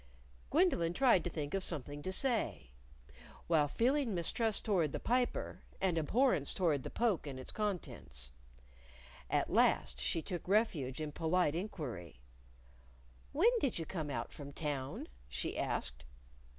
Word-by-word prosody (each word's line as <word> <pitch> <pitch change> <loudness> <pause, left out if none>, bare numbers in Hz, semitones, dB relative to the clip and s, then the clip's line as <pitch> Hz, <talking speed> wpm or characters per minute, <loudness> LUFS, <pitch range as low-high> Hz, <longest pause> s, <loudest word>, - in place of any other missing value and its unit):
Gwendolyn 280 - +3
tried 240 -10 +5
to - - 0
think 150 -4 -4
of 195 -1 0
something 145 -3 -3
to 185 - -3
say 220 - 0 0.7
while 155 -3 +3
feeling 245 - +1
mistrust 210 +5 +1
toward 175 -9 +2
the - - -2
Piper, 245 +1 0 0.2
and 185 -3 +2
abhorrence 165 - +2
toward 160 -7 +2
the - - -5
poke 220 -10 +1
and 135 -2 -5
its 130 - -6
contents. 125 - -4 1.0
At - - +1
last 60 0 +3
she 155 - 0
took 175 -3 -5
refuge 170 - +1
in 155 -1 -3
polite 165 0 +2
inquiry. 130 - -5 1.1
"When 390 +12 +5
did 275 - 0
you 165 - -2
come 155 -3 -4
out 140 - -3
from 140 -1 -8
town?" 140 -3 -3 0.2
she - - -2
asked. 60 0 -2
165 Hz, 140 wpm, -35 LUFS, 140-210 Hz, 1.1 s, tried